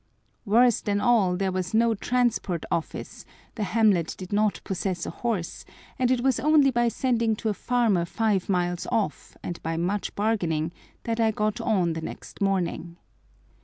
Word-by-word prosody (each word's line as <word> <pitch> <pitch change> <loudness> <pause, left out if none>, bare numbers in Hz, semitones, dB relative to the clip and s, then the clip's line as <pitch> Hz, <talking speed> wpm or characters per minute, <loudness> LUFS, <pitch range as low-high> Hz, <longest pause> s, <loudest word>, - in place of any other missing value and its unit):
Worse 235 +2 +4
than 205 -1 0
all, 210 -6 +3
there 190 0 0
was 185 +2 -2
no 230 0 +4
Transport 225 -6 0
Office, 170 -2 -4 0.3
the 220 - -6
hamlet 200 -4 +2
did 185 +1 -7
not 210 0 +2
possess 185 -2 -3
a - - -4
horse, 215 -8 -3 0.4
and 250 -1 +2
it 255 -1 +2
was 260 -2 +2
only 290 +1 +4
by 240 -1 +2
sending 230 -2 +1
to 220 - -2
a - - +1
farmer 225 -6 +1
five 205 0 0
miles 175 -2 0
off, 205 -9 -2
and 175 - -5
by 165 0 -3
much 190 +4 -2
bargaining, 170 -7 0 0.3
that 230 0 -2
I 225 -1 +4
got 215 -1 -1
on 185 -7 +1
the 160 - -5
next - - -9
morning. 175 -3 -1
205 Hz, 165 wpm, -26 LUFS, 180-230 Hz, 0.4 s, Worse